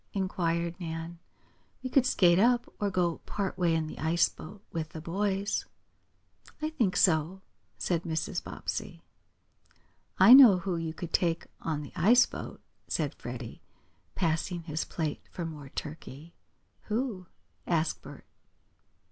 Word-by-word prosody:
inquired 170 -3 -1
Nan. 165 0 -6 0.6
"We 255 - -3
could 260 -2 +4
skate 175 -7 +4
up, 240 +3 +4
or 205 - 0
go 175 -3 0
part 195 -2 -2
way 175 -3 +2
in 160 -1 0
the 155 - -8
ice 165 +2 +3
boat 195 +5 -12
with 160 -1 -4
the 160 - -6
boys." 195 +4 -1 0.9
"I 310 +1 -2
think 225 -12 0
so," 180 +2 +2 0.3
said 170 -3 0
Mrs. 160 -2 -3
Bobbsey. - - -5 1.1
"I 240 - +9
know 255 -8 +10
who 180 0 -2
you 165 -1 -4
could 170 -2 -7
take 170 -2 +1 0.2
on 150 -2 -2
the 145 - -11
ice 235 +9 +6
boat," - - -8 0.3
said - - -1
Freddie, - - -8 0.5
passing 170 0 -1
his 160 -1 -3
plate 155 -3 -3
for 170 - -5
more 150 -4 -8
turkey. 150 +1 -8 0.5
"Who?" 215 -5 -2 0.4
asked 165 -2 0
Bert. - - -12
170 Hz, 140 wpm, -29 LUFS, 160-195 Hz, 1.1 s, know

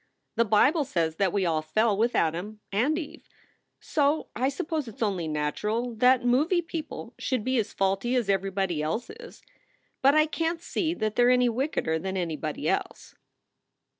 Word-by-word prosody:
The 230 0 +3
Bible 265 - +4
says 165 - -1
that 195 -3 +2
we 195 -1 0
all 160 -2 +1
fell 215 +7 +1
with 230 +4 +1
Adam 175 +7 -1
and 250 +11 +1
Eve. 320 -1 -8 0.5
So 295 0 0
I 255 +3 +1
suppose 305 0 -3
it 225 - -9
s - - -3
only 190 -6 -1
natural 210 +11 -2
that 250 +2 +3
movie 305 +9 +2
people 310 -7 -6
should 255 -5 -1
be 260 0 +1
as 215 - -2
faulty 195 +6 0
as 240 -5 +1
everybody 195 -4 0
else 160 +11 -3
is. 470 +1 -13 0.6
But 275 +2 +5
I 310 0 +5
can 330 +2 -1
t 335 - -23
see 330 -2 -1
that 215 -6 -2
they 245 - +5
re 245 +1 +6
any 250 -1 +3
wickeder 230 - -1
than 190 +2 -3
anybody 160 -4 -3
else." - - -2
230 Hz, 180 wpm, -27 LUFS, 190-280 Hz, 0.6 s, re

